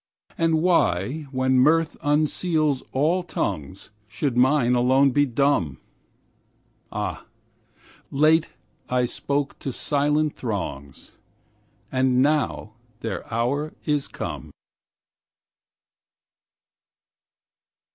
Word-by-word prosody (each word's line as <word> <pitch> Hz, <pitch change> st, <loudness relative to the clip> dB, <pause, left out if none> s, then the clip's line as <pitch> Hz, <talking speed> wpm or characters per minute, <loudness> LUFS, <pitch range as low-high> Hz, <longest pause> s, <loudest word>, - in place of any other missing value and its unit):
And 165 Hz, -1 st, +1 dB
why, 145 Hz, -, +1 dB
when 130 Hz, -1 st, +2 dB
mirth 160 Hz, +4 st, +3 dB
unseals 155 Hz, -1 st, +1 dB
all 155 Hz, +7 st, +1 dB
tongues, 95 Hz, -, -4 dB, 0.2 s
Should 120 Hz, +5 st, -2 dB
mine 125 Hz, 0 st, +3 dB
alone 130 Hz, +3 st, +4 dB
be 145 Hz, +2 st, +2 dB
dumb? 120 Hz, -, +1 dB, 1.1 s
Ah! -, -, -4 dB, 0.8 s
late 155 Hz, +3 st, +3 dB, 0.4 s
I 125 Hz, 0 st, +2 dB
spoke 140 Hz, +3 st, -2 dB
to 135 Hz, -, -4 dB
silent 150 Hz, +3 st, +1 dB
throngs, 80 Hz, -, -5 dB, 0.8 s
And 130 Hz, -1 st, +2 dB
now 145 Hz, -7 st, 0 dB, 0.3 s
their 115 Hz, -, -5 dB
hour 135 Hz, +7 st, -1 dB
is 150 Hz, -2 st, 0 dB
come. -, -, -6 dB
140 Hz, 85 wpm, -24 LUFS, 125-150 Hz, 1.1 s, alone